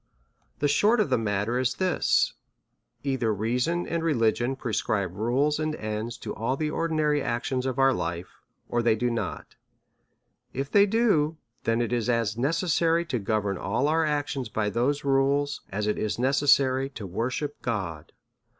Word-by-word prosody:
The 145 - +1
short 210 +11 +3
of 205 -10 +1
the 125 - +4
matter 105 +2 0
is 130 -2 0
this 185 -1 +2 0.3
— - - -48
either 130 -5 0
reason 125 - 0
and 170 0 -1
religion 120 -4 +1
prescribe 110 -6 -1
rules 135 +8 +1
and 155 0 -1
ends 110 +1 -4
to - - -4
all 115 +4 -2
the 155 0 -1
ordinary 155 -3 +1
actions 125 +2 -2
of 130 0 -2
our 135 0 +4
life, 85 -3 -4 0.3
or 120 - 0
they 115 -1 +3
do 120 +2 0
not: 115 - -4 1.0
if 135 +2 -4
they 200 0 +6
do, 190 -9 +2 0.3
then 115 +1 +2
it 120 - -2
is 120 0 0
as 115 -3 +1
necessary 165 +5 +1
to 125 -7 -2
govern 105 -2 -1
all 115 +8 0
our 160 +2 +2
actions 145 -5 -1
by 105 0 -1
those 135 +6 0
rules 140 +1 +1
as 105 +2 -2
it 105 - 0
is 105 - -1
necessary 135 0 +3
to 115 -7 -8
worship 125 - -3
God. 95 -10 -4
130 Hz, 165 wpm, -26 LUFS, 110-150 Hz, 1.0 s, they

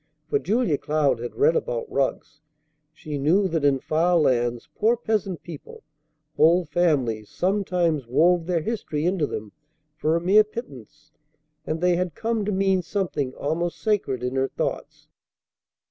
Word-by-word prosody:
For 425 - +3
Julia 220 - 0
Cloud 145 -5 +1
had 120 +1 -6
read 470 +3 +3
about - - -2
rugs. 150 - -2 0.5
She 155 -2 -6
knew 180 +8 +3
that 160 -3 -1
in 140 -1 +4
far 170 +5 +2
lands 120 -5 +1
poor 225 +3 +2
peasant 215 -6 -2
people, 165 -4 -10 0.5
whole 170 +3 +5
families, 140 -10 0
sometimes 180 - 0
wove 165 +6 +3
their 175 -3 +1
history 165 -9 -3
into 175 -4 +1
them 105 -1 -6 0.4
for 155 +1 0
a - - +2
mere 195 +5 +5
pittance; 150 - -10 0.6
and 160 +1 -2
they 180 -1 +3
had 180 -3 -2
come 225 -2 -1
to 210 - -1
mean 190 -1 +2
something 170 -8 -3
almost 170 +4 -2
sacred 190 - -1
in 125 +1 -2
her 135 0 +2
thoughts. - - -5
170 Hz, 150 wpm, -24 LUFS, 145-195 Hz, 0.6 s, whole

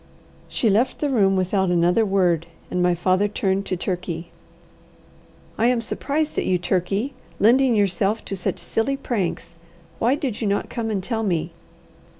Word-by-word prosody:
She 235 - 0
left 220 +5 +2
the 290 -2 -1
room 195 -6 +3
without 190 0 +1
another 175 +5 +3
word, 180 -5 +1 0.2
and 180 - 0
my 180 0 +3
father 185 +4 +2
turned 195 -1 -1
to 185 - -1
Turkey. 175 -2 -4 1.3
"I 230 - +4
am 245 -1 +3
surprised 285 +6 -2
at - - -2
you, 185 - +2
Turkey, 195 +8 -1 0.2
lending 245 +3 +4
yourself 205 +1 +1
to 195 - -3
such 185 0 -2
silly 225 +9 -1
pranks. 195 -9 -3 0.4
Why 245 +4 +3
did 260 -7 -3
you 220 - 0
not 200 0 -1
come 230 -2 -3
and 200 -4 -2
tell 225 +2 -2
me." 170 -5 -1
195 Hz, 160 wpm, -23 LUFS, 180-230 Hz, 1.3 s, I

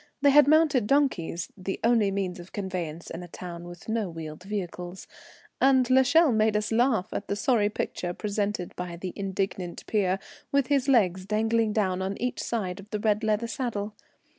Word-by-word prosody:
They 285 - +7
had 295 0 +7
mounted 300 -7 +4
donkeys, 205 - +1
the 190 0 -4
only 225 -3 +4
means 195 -2 -2
of 175 +1 -11
conveyance 180 -5 -4
in 165 - -5
a 175 - -8
town 175 0 -8
with 175 0 -11
no 220 -3 -1
wheeled 160 -1 -7
vehicles; 180 -2 -5 0.6
and 260 -2 +5
l'Echelle 265 +4 +5
made 215 -1 +3
us 210 +1 -2
laugh 225 -3 +2
at 200 - -4
the 200 - -1
sorry 210 -1 +2
picture 180 -4 -3
presented 205 -1 -2
by 180 -1 -5
the 180 +1 -6
indignant 190 -2 -3
peer, 195 -3 +1 0.3
with 280 -1 +3
his 280 -2 +2
legs 190 -8 +3
dangling 220 +1 +1
down 190 -4 0
on 195 +1 -3
each 250 +1 -2
side 195 -5 -2
of 200 +2 -12
the 210 - -2
red 210 0 +1
leather 215 +1 +1
saddle. 230 -4 -3
205 Hz, 180 wpm, -27 LUFS, 185-230 Hz, 0.6 s, They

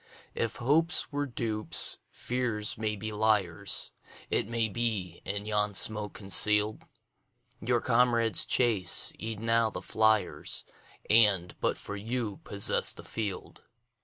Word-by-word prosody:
If 115 -1 -4
hopes 160 +8 +1
were 145 0 -4
dupes, 110 -3 +2
fears 115 -4 -1
may 110 -1 -4
be 110 +2 -7
liars; 105 -3 -1 0.4
It - - 0
may 115 -1 0
be, 105 -6 -4
in 100 +1 -3
yon 105 -1 -2
smoke 105 +1 +2
conceal'd, 105 +1 +2 0.8
Your 120 +2 -2
comrades 115 -2 +1
chase 110 -8 +2
e'en 110 0 -7
now 115 0 +1
the 90 - -8
fliers, 110 +2 -1 0.4
And, 105 -6 +6
but - - -1
for 100 - -8
you, 110 0 -5
possess 100 0 +1
the - - -14
field. 105 -5 -7
110 Hz, 125 wpm, -27 LUFS, 105-115 Hz, 0.8 s, And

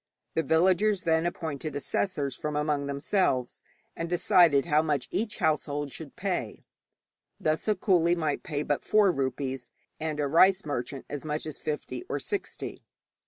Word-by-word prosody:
The 160 - +2
villagers 185 +5 +3
then 160 0 +2
appointed 155 -4 -4
assessors 145 -2 -1
from 150 -1 -4
among 150 -1 0
themselves, 140 -3 0 0.3
and 165 0 -4
decided 170 -4 +4
how 155 -2 +3
much 150 -5 -1
each 215 0 -1
household 145 -2 0
should 155 0 -9
pay. 180 - -3 0.7
Thus 155 +5 0
a 215 - +3
coolie 175 -3 +3
might 155 -3 -1
pay 145 -1 -3
but 145 -1 -1
four 210 -3 +4
rupees, 135 -2 -3 0.3
and 155 -1 -3
a 145 - +1
rice 185 +6 +5
merchant 135 -1 -4
as 145 - -5
much 150 0 -3
as 155 -2 -6
fifty 150 - -4
or - - -1
sixty. 405 -2 -4
155 Hz, 155 wpm, -28 LUFS, 145-175 Hz, 0.7 s, rice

